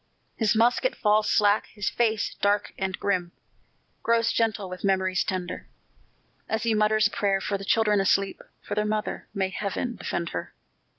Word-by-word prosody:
His 220 Hz, -1 st, +2 dB
musket 245 Hz, -, +2 dB
falls 210 Hz, 0 st, +2 dB
slack; 210 Hz, 0 st, +3 dB
his 205 Hz, -2 st, -5 dB
face, 220 Hz, -3 st, +1 dB
dark 205 Hz, 0 st, +1 dB
and 190 Hz, -1 st, -3 dB
grim, 180 Hz, -3 st, -1 dB, 0.7 s
Grows 230 Hz, 0 st, +2 dB
gentle 220 Hz, -3 st, 0 dB
with 185 Hz, 0 st, -8 dB
memories 190 Hz, -2 st, +1 dB
tender, 185 Hz, -2 st, -4 dB, 0.8 s
As 220 Hz, 0 st, -1 dB
he 230 Hz, -1 st, +2 dB
mutters 215 Hz, 0 st, +3 dB
a 205 Hz, -, +2 dB
prayer 195 Hz, -1 st, +1 dB
for 200 Hz, -, -2 dB
the 195 Hz, -, -4 dB
children 210 Hz, 0 st, +3 dB
asleep 195 Hz, 0 st, +1 dB, 0.2 s
For -, -, -5 dB
their 210 Hz, 0 st, +1 dB
mother 215 Hz, 0 st, -2 dB
may 190 Hz, -1 st, 0 dB
Heaven 210 Hz, +5 st, -3 dB
defend 170 Hz, -1 st, -3 dB
her! 85 Hz, -, -6 dB
205 Hz, 165 wpm, -26 LUFS, 195-220 Hz, 0.8 s, slack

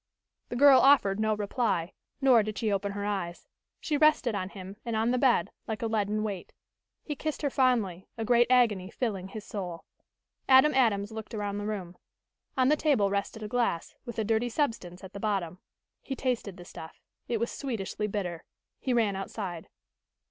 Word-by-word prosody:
The -, -, -4 dB
girl 275 Hz, +1 st, +8 dB
offered 235 Hz, -8 st, +5 dB
no 215 Hz, 0 st, +2 dB
reply, 205 Hz, -4 st, -1 dB, 0.3 s
nor 255 Hz, -4 st, +6 dB
did 215 Hz, 0 st, -4 dB
she 220 Hz, -3 st, 0 dB
open 200 Hz, 0 st, -1 dB
her 200 Hz, 0 st, -3 dB
eyes. 190 Hz, -4 st, -3 dB, 0.3 s
She 300 Hz, -, -1 dB
rested 305 Hz, -6 st, +4 dB
on 185 Hz, -2 st, -2 dB
him 195 Hz, 0 st, -9 dB
and 235 Hz, -2 st, -3 dB
on 225 Hz, +2 st, +2 dB
the 250 Hz, -, +1 dB
bed 260 Hz, -2 st, +3 dB, 0.2 s
like 220 Hz, 0 st, -3 dB
a -, -, +1 dB
leaden 215 Hz, -1 st, 0 dB
weight. 200 Hz, -4 st, -5 dB, 0.5 s
He 295 Hz, -, -4 dB
kissed 310 Hz, +2 st, -4 dB
her 285 Hz, -, +1 dB
fondly, 225 Hz, -10 st, +1 dB
a 225 Hz, -, -2 dB
great 240 Hz, +1 st, +4 dB
agony 220 Hz, -7 st, +3 dB
filling 200 Hz, -6 st, -3 dB
his 205 Hz, +2 st, -8 dB
soul. 180 Hz, -5 st, -6 dB, 0.6 s
Adam 265 Hz, +3 st, +7 dB
Adams 220 Hz, -5 st, +2 dB
looked 220 Hz, 0 st, -7 dB
around 205 Hz, -1 st, -2 dB
the 205 Hz, -, -4 dB
room. 185 Hz, -5 st, -5 dB, 0.6 s
On 255 Hz, 0 st, +4 dB
the 300 Hz, -, +5 dB
table 265 Hz, -11 st, +2 dB
rested 200 Hz, +2 st, -2 dB
a -, -, -3 dB
glass, 230 Hz, -7 st, -1 dB
with 235 Hz, -3 st, -8 dB
a 220 Hz, -, +1 dB
dirty 225 Hz, +3 st, +1 dB
substance 220 Hz, -, -2 dB
at 190 Hz, -, -10 dB
the 200 Hz, -, -6 dB
bottom. 190 Hz, -4 st, -2 dB, 0.4 s
He 270 Hz, -, -5 dB
tasted 240 Hz, -8 st, -2 dB
the 175 Hz, -, -11 dB
stuff. 160 Hz, -2 st, -10 dB, 0.3 s
It 235 Hz, -2 st, -1 dB
was 235 Hz, -, -1 dB
sweetishly 215 Hz, -5 st, -3 dB
bitter. 180 Hz, -5 st, -3 dB, 0.4 s
He 260 Hz, -, -1 dB
ran 215 Hz, -4 st, +2 dB
outside. 190 Hz, -3 st, -5 dB
215 Hz, 185 wpm, -29 LUFS, 195-245 Hz, 0.6 s, girl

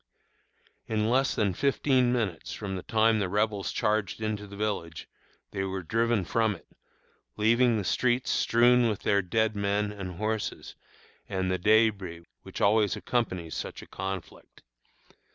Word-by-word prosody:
In 110 Hz, 0 st, 0 dB
less 130 Hz, +2 st, +2 dB
than 100 Hz, -3 st, +1 dB
fifteen 130 Hz, +1 st, +2 dB
minutes 110 Hz, -9 st, -2 dB
from 100 Hz, -2 st, -5 dB
the 90 Hz, -, -4 dB
time 110 Hz, +2 st, +2 dB
the 95 Hz, -3 st, -1 dB
Rebels 105 Hz, 0 st, 0 dB
charged 105 Hz, -1 st, 0 dB
into 105 Hz, -1 st, -3 dB
the 100 Hz, -, -11 dB
village 100 Hz, -6 st, -3 dB, 0.4 s
they 95 Hz, -, -2 dB
were 95 Hz, -1 st, -4 dB
driven 115 Hz, +2 st, +1 dB
from 110 Hz, +3 st, +1 dB
it, -, -, -16 dB, 0.7 s
leaving 115 Hz, +2 st, +3 dB
the 105 Hz, -, -2 dB
streets 125 Hz, +5 st, +1 dB
strewn 120 Hz, 0 st, +4 dB
with 105 Hz, -, -3 dB
their 100 Hz, 0 st, +3 dB
dead 110 Hz, +4 st, 0 dB
men 100 Hz, +1 st, 0 dB
and 95 Hz, -3 st, -7 dB
horses, 110 Hz, +2 st, -3 dB, 0.6 s
and 95 Hz, -1 st, -1 dB
the 95 Hz, -, -1 dB
débris 100 Hz, -5 st, +2 dB, 0.2 s
which -, -, -8 dB
always 105 Hz, -1 st, +3 dB
accompanies 90 Hz, -, -2 dB
such -, -, -5 dB
a -, -, -14 dB
conflict. 95 Hz, -2 st, -7 dB
105 Hz, 150 wpm, -28 LUFS, 95-115 Hz, 0.7 s, strewn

